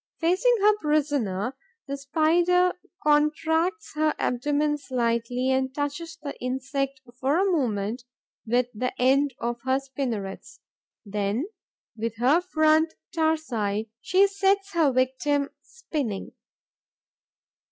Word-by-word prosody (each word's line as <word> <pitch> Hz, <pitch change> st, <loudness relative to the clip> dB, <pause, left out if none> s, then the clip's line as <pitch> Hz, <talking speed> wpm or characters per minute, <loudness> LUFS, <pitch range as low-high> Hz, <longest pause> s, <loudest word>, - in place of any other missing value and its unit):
Facing 370 Hz, +9 st, +3 dB
her 420 Hz, +1 st, +5 dB
prisoner, 275 Hz, -, 0 dB, 0.3 s
the 280 Hz, -, -3 dB
Spider 340 Hz, +6 st, +3 dB, 0.3 s
contracts 320 Hz, +6 st, +1 dB
her 310 Hz, 0 st, +1 dB
abdomen 295 Hz, +4 st, 0 dB
slightly 245 Hz, -1 st, 0 dB
and 260 Hz, 0 st, +1 dB
touches 310 Hz, +3 st, -3 dB
the 285 Hz, -1 st, -5 dB
insect 270 Hz, +1 st, -2 dB, 0.2 s
for 275 Hz, +4 st, +2 dB
a 385 Hz, -, +3 dB
moment 240 Hz, -, -1 dB, 0.4 s
with 240 Hz, +2 st, +2 dB
the 250 Hz, +4 st, -3 dB
end 270 Hz, +1 st, +3 dB
of 235 Hz, 0 st, -3 dB
her 260 Hz, +1 st, +1 dB
spinnerets; 250 Hz, -8 st, -5 dB, 0.5 s
then, 205 Hz, +6 st, -1 dB, 0.5 s
with 225 Hz, 0 st, -3 dB
her 260 Hz, +9 st, +3 dB
front 315 Hz, -2 st, +2 dB, 0.2 s
tarsi, 240 Hz, -11 st, 0 dB
she 380 Hz, +2 st, +4 dB
sets 395 Hz, 0 st, +1 dB
her 320 Hz, -5 st, +3 dB
victim 265 Hz, +3 st, +1 dB
spinning. 290 Hz, -, -4 dB
280 Hz, 110 wpm, -26 LUFS, 245-320 Hz, 0.5 s, her